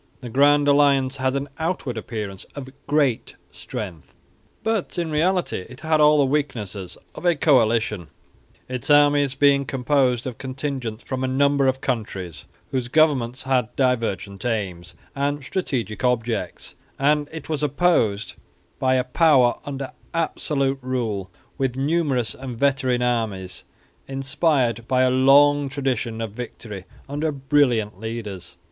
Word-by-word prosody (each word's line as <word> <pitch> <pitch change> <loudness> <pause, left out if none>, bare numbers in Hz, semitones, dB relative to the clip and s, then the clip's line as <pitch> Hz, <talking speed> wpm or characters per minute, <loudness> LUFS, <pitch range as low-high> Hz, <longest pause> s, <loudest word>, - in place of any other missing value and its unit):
The 125 - -7
Grand 145 +3 +4
Alliance 140 -2 +3
had 130 0 0
an 140 +1 -2
outward 160 -7 -2
appearance 105 -3 -5
of 135 -2 -7 0.2
great 140 -5 +1 0.2
strength, 80 - -8 0.5
but 220 -5 -1
in 170 -2 -1
reality 170 - 0
it 130 - -12
had 155 -1 +2
all 150 0 +6
the 145 - +4
weaknesses 105 -10 -3 0.2
of - - -10
a 175 -1 +3
coalition, 115 - +2 0.6
its 125 0 -5
armies 145 -2 +4
being 140 0 +4
composed 130 -2 +1
of 125 -3 -6
contingents 130 -4 -4
from 130 -1 -3
a - - +1
number 140 +1 +2
of 130 0 0
countries, 95 - -4 0.3
whose 130 -2 -1
governments 130 -4 +2
had 125 -3 0
divergent 110 -7 -1
aims 90 -7 -3 0.2
and 140 +1 -1
strategic 125 - -3
objects, 115 -7 -1 0.2
and 145 +1 +2
it 160 -2 -8
was 155 -3 -2
opposed 140 - +1 0.5
by 130 0 +2
a 130 - +2
power 130 -2 +4
under 135 -2 -5 0.2
absolute 140 -4 0
rule 115 -7 -2 0.3
with 130 -2 0
numerous 140 -5 0
and 130 -3 -7
veteran 130 -2 +1
armies 105 -7 -2 0.4
inspired 135 -4 0
by 130 0 +3
a 130 - +3
long 140 +2 +5
tradition 125 -5 -2
of 110 -2 -4
victory 110 -4 -8 0.2
under 150 +3 -1
brilliant 130 -8 +1
leaders. 105 -6 -6
130 Hz, 135 wpm, -23 LUFS, 115-145 Hz, 0.6 s, all